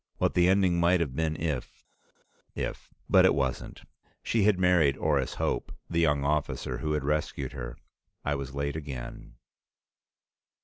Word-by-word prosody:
What - - +1
the 90 0 +4
ending 95 -3 +3
might 85 +1 +4
have 70 -6 -2
been 80 0 0
if 75 -6 -3 0.7
if - - -5 0.2
But - - +6
it - - +5
wasn't; 65 -2 -3 0.4
she 110 -4 +1
had 105 -3 +4
married 90 -7 +3
Orris 70 -4 0
Hope, - - -2 0.2
the 85 - +1
young 75 -4 +2
officer 70 -3 -1
who 75 +4 -1
had 75 -2 -1
rescued 70 -2 -1
her. 65 -1 -7 0.5
I 75 - +1
was 70 -1 -5
late 70 +1 -2
again. 70 -6 -7
75 Hz, 150 wpm, -28 LUFS, 70-85 Hz, 0.7 s, But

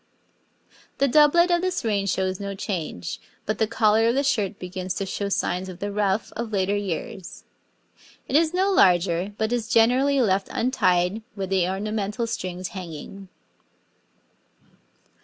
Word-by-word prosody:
The 275 - +3
doublet 305 +6 +5
of 345 0 +3
this 365 -8 -2
reign 200 -3 0
shows 190 -1 -1
no 200 -1 -4
change, 175 - -4 0.3
but 215 - -2
the 220 - +2
collar 225 0 +3
of 235 - +2
the 275 - +2
shirt 215 -9 0
begins 185 0 -5
to 195 - -2
show 200 +1 -3
signs 185 -1 -1
of 180 - -8
the 205 +2 -4
ruff 200 0 -1
of 235 -1 -4
later 200 0 +1
years. 195 -1 -5 0.8
It - - -2
is 315 +1 +4
no 380 +2 +1
larger, 180 - +3
but 220 +2 0
is 235 -2 -1
generally 255 +5 +4
left 195 -5 +2
untied 190 -5 +1
with 195 -2 -4
the 185 -2 +2
ornamental 210 +3 -2
strings 185 -5 -4
hanging. 185 +1 -8
205 Hz, 150 wpm, -24 LUFS, 185-235 Hz, 0.8 s, doublet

